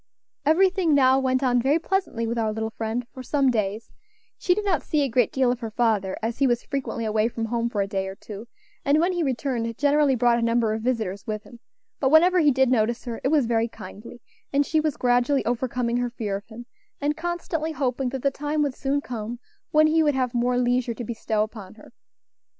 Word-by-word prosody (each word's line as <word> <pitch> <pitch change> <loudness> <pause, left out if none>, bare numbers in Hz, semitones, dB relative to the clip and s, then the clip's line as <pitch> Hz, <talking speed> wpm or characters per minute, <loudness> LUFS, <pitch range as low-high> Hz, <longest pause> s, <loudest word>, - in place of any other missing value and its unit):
Everything 365 -1 +3
now 265 -1 +5
went 260 0 0
on 245 -2 +3
very 275 +5 +3
pleasantly 335 -9 -1
with 230 +1 -2
our 220 -1 0
little 220 +1 -3
friend 225 +2 -3
for 260 - -8
some 270 0 +1
days; 215 -1 -2 0.4
she 360 - +1
did 420 +1 -3
not 370 -7 +1
see 300 -2 0
a - - +1
great 245 -2 +2
deal 260 -2 +2
of 245 - -3
her 230 -2 -5
father, 215 -4 0
as 230 +1 -2
he 275 - +4
was 240 -1 0
frequently 270 -5 -3
away 215 0 +1
from 230 -1 -4
home 235 +1 -1
for 210 -3 -1
a - - -5
day 195 -1 -2
or 190 - -6
two, 210 +1 -10 0.4
and, 285 +2 +3
when 350 +3 +2
he 350 - -1
returned, 245 -5 -2
generally 290 -1 +3
brought 240 0 +3
a - - -2
number 230 -1 +1
of 220 - -3
visitors 220 -5 -2
with 215 -1 -3
him; 235 - -15 0.4
but 265 - +2
whenever 350 +5 +5
he 305 -3 +5
did 265 -2 +3
notice 235 -1 +1
her 235 -2 -5
it - - +2
was 290 -2 +3
very 230 0 +1
kindly, 220 +1 -11 0.3
and 285 +1 +2
she 315 - +1
was 310 -2 -1
gradually 245 +3 +2
overcoming 245 0 -1
her 245 0 -1
fear 215 -4 -3
of 200 - -7
him, 240 +1 -10 0.3
and 290 +1 0
constantly 325 -1 -3
hoping 260 -2 -1
that 265 0 -5
the 275 - +2
time 295 +2 -1
would 280 -2 -1
soon 280 +2 -1
come 235 -2 -5 0.3
when 310 0 +5
he 320 +1 +3
would 295 -3 +2
have 255 -2 0
more 245 +1 +1
leisure 245 -1 +1
to 240 - -6
bestow 220 -2 -1
upon 215 -3 -9
her. 215 - -16
245 Hz, 225 wpm, -24 LUFS, 225-285 Hz, 0.4 s, now